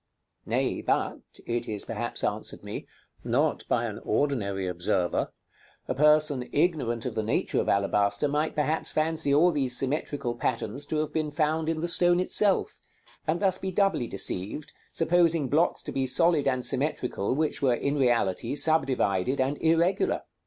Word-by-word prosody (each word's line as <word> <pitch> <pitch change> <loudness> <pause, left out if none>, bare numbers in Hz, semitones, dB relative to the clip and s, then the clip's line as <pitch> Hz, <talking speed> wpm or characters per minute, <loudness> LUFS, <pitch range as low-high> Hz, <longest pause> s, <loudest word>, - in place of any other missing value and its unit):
Nay, - - -1
but, - - -1 0.3
it 120 0 -2
is 105 -2 -2
perhaps - - -4
answered - - -3
me, - - -7 0.4
not - - 0
by - - +1
an - - -5
ordinary 100 -10 -1
observer; 90 0 -1 0.6
a - - -1
person 150 -3 +3
ignorant 145 -8 0
of 125 - -3
the 110 - -1
nature 110 - 0
of - - -3
alabaster 100 +4 +1
might 150 +2 -1
perhaps 155 +1 0
fancy 155 -2 0
all 160 +5 +5
these 135 -5 0
symmetrical 140 -2 -2
patterns 120 +2 -3
to 155 - -2
have 155 0 -2
been 155 -1 -1
found 155 +1 0
in 160 -1 -2
the 170 - -1
stone 175 0 +4
itself, 195 +1 +1 0.5
and 165 +4 0
thus 190 -2 +2
be 190 - -3
doubly 190 - +1
deceived, 100 +8 -3 0.2
supposing 165 -3 +2
blocks 155 +6 +1
to - - -5
be 135 -1 -1
solid 160 +2 +3
and 130 -2 0
symmetrical 125 -5 -1
which 155 +1 -1
were 130 -3 +3
in 140 +4 -1
reality 120 -3 +1
subdivided 135 - +2
and 135 +3 0
irregular. 170 +4 +2
145 Hz, 160 wpm, -27 LUFS, 120-160 Hz, 0.6 s, all